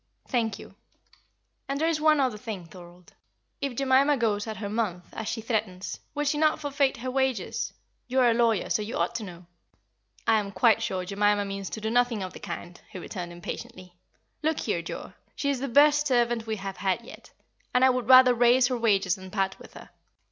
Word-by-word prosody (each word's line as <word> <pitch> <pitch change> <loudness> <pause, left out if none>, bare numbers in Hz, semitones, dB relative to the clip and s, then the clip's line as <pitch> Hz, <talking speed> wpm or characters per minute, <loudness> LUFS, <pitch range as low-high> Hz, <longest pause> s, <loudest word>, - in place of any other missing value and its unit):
"Thank 225 -5 0
you. - - -12 1.0
And 275 +1 -1
there 320 - +2
is 320 -2 0
one 310 -1 +4
other 260 -5 +1
thing, 210 -6 -6
Thorold. 175 +1 -15 0.5
If 275 -3 -2
Jemima 275 +2 +3
goes 215 -3 0
at 220 -2 -5
her 205 +1 -4
month, 200 -5 -2
as 220 - -5
she 225 0 -3
threatens, 215 -5 -3 0.2
will 295 - 0
she 295 +1 0
not 310 0 +3
forfeit 280 -2 0
her 255 +2 -4
wages? 260 -6 -1 0.4
You 260 +1 +1
are 240 -1 +5
a - - +3
lawyer, 230 -4 +1
so - - +2
you 215 +3 -4
ought - - 0
to 225 - -6
know." 180 -3 -10 0.8
"I 225 -1 +4
am 200 -1 -5
quite 220 +4 +4
sure 185 -1 -2
Jemima 205 +1 +1
means 195 -1 -5
to 220 - -6
do 220 +1 -2
nothing 245 -4 +2
of 185 - -6
the - - -10
kind," 175 -1 -7
he 200 - -9
returned, 180 -1 -6
impatiently. 180 +1 -8 0.5
"Look 315 0 0
here, - - -1
Joa, - - -7 0.2
she 280 -1 0
is 270 - -2
the 275 - -3
best 295 +3 +5
servant 240 -3 +1
we 220 - -1
have 195 -1 -6
had 195 +2 0
yet, - - -13 0.4
and 250 +1 +4
I 260 - +6
would 250 -1 -3
rather 255 -1 +8
raise 245 +1 +4
her 250 - -1
wages 200 -5 +2
than 190 0 -10
part 195 -1 -1
with - - -14
her. - - -12
225 Hz, 210 wpm, -27 LUFS, 195-260 Hz, 1.0 s, rather